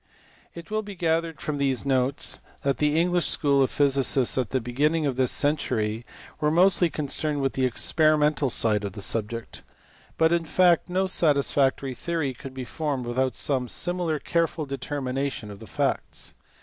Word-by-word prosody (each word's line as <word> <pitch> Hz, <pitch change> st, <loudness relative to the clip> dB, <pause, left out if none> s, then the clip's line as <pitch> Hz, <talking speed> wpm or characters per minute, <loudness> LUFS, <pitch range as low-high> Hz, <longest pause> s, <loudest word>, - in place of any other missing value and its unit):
It 170 Hz, +3 st, -10 dB
will 215 Hz, 0 st, 0 dB
be 205 Hz, -2 st, -9 dB
gathered 165 Hz, -1 st, -1 dB
from 150 Hz, -2 st, -3 dB
these 135 Hz, -1 st, 0 dB
notes 135 Hz, 0 st, +1 dB, 0.2 s
that 140 Hz, -1 st, 0 dB
the 150 Hz, +1 st, +2 dB
English 175 Hz, 0 st, +2 dB
school 140 Hz, -2 st, +2 dB
of 130 Hz, -, +3 dB
physicists 135 Hz, -2 st, +2 dB
at 125 Hz, -5 st, -1 dB
the 130 Hz, -, 0 dB
beginning 150 Hz, +7 st, 0 dB
of 135 Hz, -3 st, -1 dB
this 130 Hz, -1 st, +2 dB
century 115 Hz, -6 st, 0 dB, 0.3 s
were 150 Hz, -1 st, +2 dB
mostly 175 Hz, +1 st, +4 dB
concerned 150 Hz, 0 st, -1 dB
with 135 Hz, -1 st, 0 dB
the 130 Hz, -1 st, +1 dB
experimental 150 Hz, +2 st, +2 dB
side 105 Hz, -3 st, +1 dB
of 100 Hz, -2 st, -4 dB
the 100 Hz, -, -7 dB
subject. 115 Hz, +2 st, -2 dB, 0.6 s
But 160 Hz, +1 st, +3 dB
in 170 Hz, -1 st, 0 dB
fact 175 Hz, +1 st, +3 dB
no 185 Hz, +2 st, +1 dB
satisfactory 140 Hz, -6 st, +1 dB
theory 160 Hz, -1 st, -2 dB
could 130 Hz, +1 st, -10 dB
be 130 Hz, -1 st, -5 dB
formed 145 Hz, -3 st, -3 dB
without 125 Hz, +1 st, -1 dB
some 130 Hz, -3 st, -1 dB
similar 175 Hz, +1 st, -1 dB
careful 165 Hz, 0 st, -1 dB
determination 135 Hz, -4 st, -4 dB
of 100 Hz, -, -11 dB
the -, -, -11 dB
facts. -, -, -2 dB
140 Hz, 165 wpm, -25 LUFS, 130-160 Hz, 0.6 s, mostly